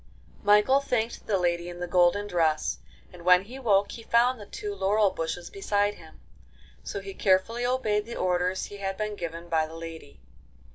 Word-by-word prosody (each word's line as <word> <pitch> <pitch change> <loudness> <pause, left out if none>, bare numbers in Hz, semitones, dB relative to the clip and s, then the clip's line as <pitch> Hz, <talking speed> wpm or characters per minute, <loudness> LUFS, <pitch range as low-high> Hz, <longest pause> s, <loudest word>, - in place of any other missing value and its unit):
Michael 210 +6 +5
thanked 240 -4 -2
the 205 - +2
lady 175 -1 0
in 175 0 -9
the 180 - -2
golden 180 +3 +3
dress, 165 -5 0 0.3
and 175 -1 -12
when 180 +1 +6
he 250 +6 -10
woke 205 -5 +2
he 230 - -8
found 235 +2 +2
the 205 - -10
two 205 -1 -5
laurel 200 +1 +2
bushes 170 0 -4
beside 205 +1 0
him. - - -16 0.6
So - - -5
he 390 - -8
carefully 225 - +1
obeyed 220 -5 0
the 235 - -6
orders 180 +1 0
he 205 - -9
had 195 -1 -3
been 210 0 -3
given 170 -2 -6
by 160 -2 +1
the 160 - -11
lady. 165 - -9
195 Hz, 185 wpm, -27 LUFS, 175-215 Hz, 0.6 s, when